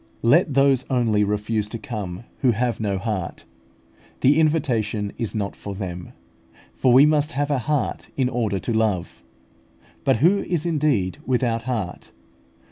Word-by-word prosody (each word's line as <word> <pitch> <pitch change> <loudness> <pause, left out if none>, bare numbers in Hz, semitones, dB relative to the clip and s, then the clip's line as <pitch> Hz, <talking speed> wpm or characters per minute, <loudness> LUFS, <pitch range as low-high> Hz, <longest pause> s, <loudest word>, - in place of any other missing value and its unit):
Let 145 +4 +4
those 135 -2 +4
only 115 -5 +2
refuse 105 +1 -1
to 115 - -5
come 105 -7 -6 0.2
who 125 -3 +3
have 120 +1 -1
no 100 -3 -1
heart. 95 -3 -4 0.8
The 145 +4 +4
invitation 115 -10 0
is 115 -3 -3
not 100 -2 -2
for 100 -1 -7
them; 90 -3 -6 0.6
for 130 - +2
we 130 +4 +8
must 150 0 +2
have 145 +1 -1
a 140 - +1
heart 145 +3 -2
in 130 -2 +2
order 115 -5 -1
to 115 +5 -3
love. 105 -11 -1 0.8
But - - +3
who 175 - +4
is 175 -4 -2
indeed 145 - 0
without 120 -3 0
heart? 105 -8 -4
115 Hz, 150 wpm, -23 LUFS, 105-140 Hz, 0.8 s, we